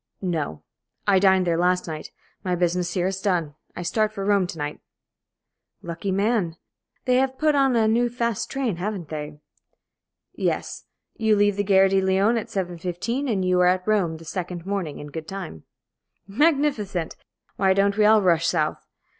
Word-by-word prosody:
"No. 160 - -2 0.4
I 195 -2 +4
dined 190 -1 +4
there 170 -1 +1
last 180 +1 +2
night. 155 -1 -6 0.3
My 180 -2 0
business 175 0 0
here 180 -1 +1
is 190 0 -2
done. 175 -7 0 0.2
I 175 - -5
start 215 +4 +1
for 195 -2 -5
Rome 200 -3 +3
to 170 - -7
night." 145 0 -4 1.0
"Lucky 170 +3 -4
man. 195 -4 0 0.5
They 250 0 +3
have 265 0 +1
put 310 +1 +2
on 270 -3 +3
a 225 -1 +3
new 240 +2 +2
fast 235 -3 -2
train, 255 -9 -2
haven't 185 -3 -4
they?" 150 -1 -6 0.9
"Yes. - - -2 0.3
You 220 -1 +3
leave 205 -1 +3
the 205 - 0
Gare 195 -1 +5
de 195 0 +2
Lyon 190 +4 +2
at - - -7
7.15, 185 - -3
and 190 -4 0
you 180 0 +2
are 180 - +5
at 185 +1 +1
Rome 190 -7 +1
the 165 - -13
second 180 0 -5
morning, 195 -7 -3
in 145 0 -9
good 160 +1 -6
time." 180 - -7 0.6
"Magnificent! 245 - +1 0.4
Why 190 -1 +3
don't 200 +1 +2
we 215 - +3
all 215 -1 +5
rush 170 -2 +3
south? 155 -3 0
190 Hz, 175 wpm, -24 LUFS, 175-215 Hz, 1.0 s, Gare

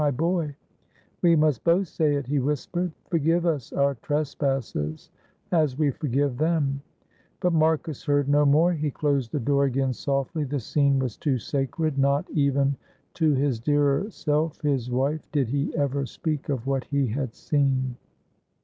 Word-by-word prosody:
"My 145 - +3
boy, 160 +1 -1 0.7
we 170 -1 +5
must 150 -5 +2
both 175 +3 +3
say 155 -2 +1
it," 140 -1 -2
he 145 +2 0
whispered. 150 +6 -1 0.2
"Forgive 165 +1 +2
us 150 -8 -1
our 140 0 +2
trespasses 135 - -2 0.4
as 155 -6 +2
we 150 -2 +2
forgive 140 -1 -1
them" 150 -4 +1 0.6
but 180 -1 +1
Marcus 160 -2 +1
heard 145 -2 +2
no 145 +1 +4
more, 155 +5 +4
he 155 -2 -1
closed 140 -4 -1
the 150 - -1
door 140 +3 +2
again 135 0 0
softly 140 +4 -2
the 145 0 -2
scene 140 +3 +2
was 130 -5 -2
too 140 -4 0
sacred 140 +4 -2
not 140 +1 +2
even 140 -2 +1 0.4
to 155 -3 +2
his 135 -3 0
dearer 145 - +1
self 155 -4 -1
his 135 -5 0
wife 135 +5 -1
did 140 -6 +1
he 140 +4 -1
ever 140 -2 0
speak 155 -1 -4
of 130 -4 -2
what 135 -1 -1
he 140 -1 0
had 125 +1 -3
seen. 135 -3 0
145 Hz, 160 wpm, -25 LUFS, 135-155 Hz, 0.7 s, we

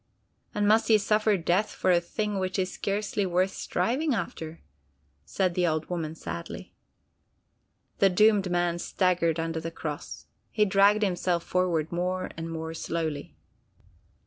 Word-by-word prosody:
"And 205 0 +1
must 220 +2 +4
he 220 - +6
suffer 210 0 +2
death 180 +5 +1
for 185 - 0
a 175 -1 +4
thing 210 +3 -2
which 185 +1 -2
is 185 -1 -1
scarcely 205 0 -1
worth 185 +1 +1
striving 250 - 0
after?" 165 -4 -5 0.6
said 185 -2 0
the 180 0 +1
old 155 +1 -1
woman 160 -3 -3
sadly. 85 - -7 1.3
The 195 - +6
doomed 205 0 +4
man 175 -1 0
staggered 175 -3 +1
under 165 0 -2
the 165 +1 -4
cross. 145 - -6 0.2
He 210 -1 +2
dragged 200 +2 +4
himself 180 -3 0
forward 175 -4 0
more 180 +1 -2
and 165 0 -5
more 160 0 -4
slowly. 160 -3 -3
180 Hz, 145 wpm, -27 LUFS, 165-200 Hz, 1.3 s, he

